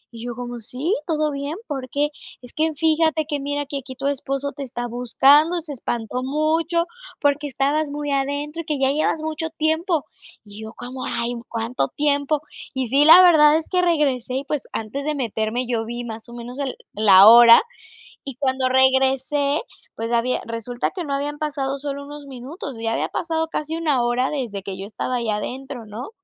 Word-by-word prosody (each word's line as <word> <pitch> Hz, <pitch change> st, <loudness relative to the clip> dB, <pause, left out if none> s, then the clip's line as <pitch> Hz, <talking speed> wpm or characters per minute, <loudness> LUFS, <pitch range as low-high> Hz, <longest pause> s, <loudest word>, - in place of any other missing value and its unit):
Y 230 Hz, -, -8 dB
yo 240 Hz, -1 st, -5 dB
como: 245 Hz, 0 st, -6 dB
"Sí, 260 Hz, -, -2 dB
todo 305 Hz, -2 st, 0 dB
bien, 280 Hz, +2 st, -4 dB
¿por 270 Hz, -4 st, -5 dB
qué?". 290 Hz, +3 st, 0 dB, 0.3 s
"Es 245 Hz, -, -13 dB
que 320 Hz, +1 st, +1 dB
fíjate 315 Hz, 0 st, +2 dB
que 295 Hz, -2 st, -2 dB
mira 285 Hz, +1 st, -2 dB
que 280 Hz, 0 st, -4 dB
aquí 260 Hz, 0 st, -10 dB
tu 275 Hz, +1 st, -6 dB
esposo 280 Hz, 0 st, -2 dB
te -, -, -9 dB
está 245 Hz, -2 st, -5 dB
buscando 270 Hz, +7 st, +4 dB
y -, -, -2 dB
se 305 Hz, -2 st, -7 dB
espantó 240 Hz, -1 st, -3 dB
mucho 315 Hz, +5 st, +1 dB, 0.4 s
porque 290 Hz, 0 st, +1 dB
estabas 285 Hz, +3 st, 0 dB
muy 290 Hz, 0 st, -3 dB
adentro 285 Hz, +3 st, -2 dB
y -, -, -31 dB
que 300 Hz, -1 st, -1 dB
ya 270 Hz, 0 st, +3 dB
llevas 310 Hz, +2 st, 0 dB
mucho 315 Hz, +1 st, -3 dB
tiempo". 320 Hz, +1 st, 0 dB, 0.4 s
Y 205 Hz, +1 st, -11 dB
yo 220 Hz, +1 st, -8 dB
como: 255 Hz, +1 st, -7 dB
"Ay, 235 Hz, +1 st, -2 dB, 0.2 s
cuánto 230 Hz, -, -2 dB
tiempo". 290 Hz, 0 st, +1 dB, 0.3 s
Y 260 Hz, -1 st, -1 dB
sí, 280 Hz, +4 st, +4 dB
la 330 Hz, +4 st, +10 dB
verdad 310 Hz, -4 st, +7 dB
es 320 Hz, -, -4 dB
que 365 Hz, -1 st, +2 dB
regresé 285 Hz, -8 st, +1 dB
y, 270 Hz, -, -1 dB
pues, 295 Hz, -1 st, -3 dB
antes 225 Hz, +6 st, -4 dB
de 305 Hz, 0 st, -1 dB
meterme, 235 Hz, -1 st, -2 dB
yo 235 Hz, -2 st, -1 dB
vi 240 Hz, +1 st, -5 dB
más 225 Hz, 0 st, -8 dB
o -, -, -11 dB
menos 240 Hz, +2 st, -8 dB
el 275 Hz, -2 st, -2 dB, 0.2 s
la 200 Hz, -2 st, +7 dB
hora, 235 Hz, +1 st, +10 dB, 0.7 s
y 275 Hz, -3 st, -7 dB
cuando 260 Hz, -1 st, 0 dB
regresé, 265 Hz, +2 st, +2 dB, 0.4 s
pues 230 Hz, +1 st, -3 dB
había 235 Hz, +2 st, +1 dB
resulta 230 Hz, +2 st, -3 dB
que 365 Hz, -, -4 dB
no 285 Hz, -, -4 dB
habían 290 Hz, +1 st, -3 dB
pasado 280 Hz, -3 st, -2 dB
solo 280 Hz, 0 st, -5 dB
unos 290 Hz, 0 st, -10 dB
minutos, 270 Hz, 0 st, -8 dB
ya 225 Hz, 0 st, -1 dB
había -, -, -1 dB
pasado 320 Hz, -1 st, -2 dB
casi 315 Hz, 0 st, -3 dB
una 300 Hz, -6 st, +1 dB
hora 245 Hz, +2 st, +1 dB
desde 235 Hz, -9 st, -4 dB
que 190 Hz, -1 st, -6 dB
yo 195 Hz, -, -6 dB
estaba 235 Hz, +4 st, -3 dB
ahí 235 Hz, -2 st, -2 dB
adentro, 245 Hz, +3 st, -5 dB
¿no? 220 Hz, -, -7 dB
275 Hz, 195 wpm, -22 LUFS, 245-300 Hz, 0.7 s, la